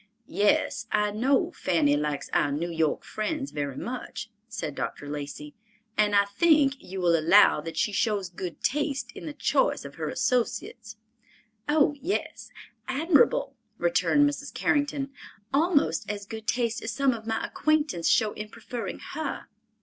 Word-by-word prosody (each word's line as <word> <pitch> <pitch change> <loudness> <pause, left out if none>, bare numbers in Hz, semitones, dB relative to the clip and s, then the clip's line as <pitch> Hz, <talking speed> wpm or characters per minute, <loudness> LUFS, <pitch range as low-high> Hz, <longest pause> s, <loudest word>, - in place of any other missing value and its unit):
"Yes, 220 -3 +1
I 210 0 +2
know 255 +6 +2
Fanny 155 -5 +2
likes 150 -1 -2
our 145 - +2
New 165 +5 -2
York 160 -2 0
friends 275 +6 -3
very 140 -2 -3
much," 235 -3 -6 0.2
said 165 - -4
Dr. 145 - -5
Lacey. 145 0 -6 0.4
"And 210 -1 +3
I 200 0 +5
think 285 +6 +4
you 190 +1 -6
will 175 -2 +3
allow 165 0 +5
that 165 +1 -7
she 210 - +1
shows 205 -2 0
good 175 -2 -7
taste 285 0 -1
in - - -9
the 300 - -5
choice - - +1
of - - -8
her - - -1
associates." 230 -3 -1 0.7
"Oh, 295 -1 +4
yes, 370 +6 -3 0.4
admirable," 330 - +3 0.2
returned 290 -12 +3
Mrs. 285 0 -4
Carrington, 285 -1 0 0.4
"almost 290 - +2
as 205 -1 -4
good 220 +1 -8
taste 235 0 0
as 225 - -4
some 265 +2 +2
of 220 -1 -8
my 225 0 -1
acquaintance 295 - +1
show 215 -2 +3
in 210 0 -7
preferring 240 +2 -6 0.2
her." 305 -1 -4
220 Hz, 150 wpm, -27 LUFS, 180-285 Hz, 0.7 s, I